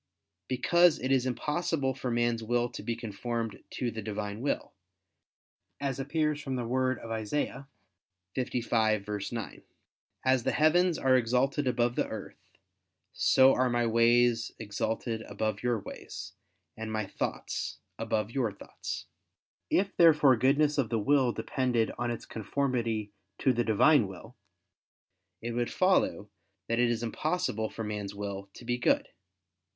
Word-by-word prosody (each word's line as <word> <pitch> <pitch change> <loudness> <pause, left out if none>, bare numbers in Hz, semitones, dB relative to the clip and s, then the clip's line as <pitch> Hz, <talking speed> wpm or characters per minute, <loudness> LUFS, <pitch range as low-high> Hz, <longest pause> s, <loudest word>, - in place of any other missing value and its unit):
Because 170 +6 +4
it 130 +2 -2
is 130 -1 +3
impossible 150 +1 -1
for 130 -1 -4
man's 120 -1 +1
will 120 +2 0
to - - -7
be 115 - -2
conformed 115 0 -4
to 120 -2 -2
the 110 - -5
Divine 105 0 -4
will; 140 - -2 1.1
as 140 -2 -2
appears 150 +2 0
from 135 -2 -3
the 125 -2 -2
word 130 +1 +1
of 115 - -9
Isa. 130 +4 -3 0.7
55:9: 110 -3 -1 0.6
"As 130 -1 +4
the - - 0
heavens 170 +3 +4
are 130 -1 +3
exalted 130 +3 +1
above 120 -1 +1
the - - 0
earth, - - -7 0.7
so 130 0 +5
are 130 0 +2
My 120 0 +1
ways 115 0 +3
exalted 110 +2 -3
above 110 0 -3
your 120 -1 +1
ways, 95 -2 -8 0.4
and 110 0 -5
My 110 -1 -1
thoughts - - -4 0.2
above 105 0 -1
your 120 -4 0
thoughts." - - -7 0.6
If 195 +1 +1
therefore 150 -6 +6
goodness 145 +5 +3
of 125 -5 +1
the 115 - 0
will 130 +3 +3
depended 120 0 0
on 120 0 0
its 120 - -4
conformity 115 -3 -2 0.3
to 130 - +2
the 120 0 +1
Divine 115 +2 +4
will, 95 -2 -11 1.1
it 120 - -2
would 120 0 -1
follow 185 - +2 0.4
that 115 +1 0
it 120 -1 +4
is 120 0 -1
impossible 120 -3 -1
for 115 - -6
man's 105 -2 -4
will 100 -1 -5
to 120 - -11
be 120 +1 -1
good. - - +2
120 Hz, 145 wpm, -30 LUFS, 110-135 Hz, 1.1 s, therefore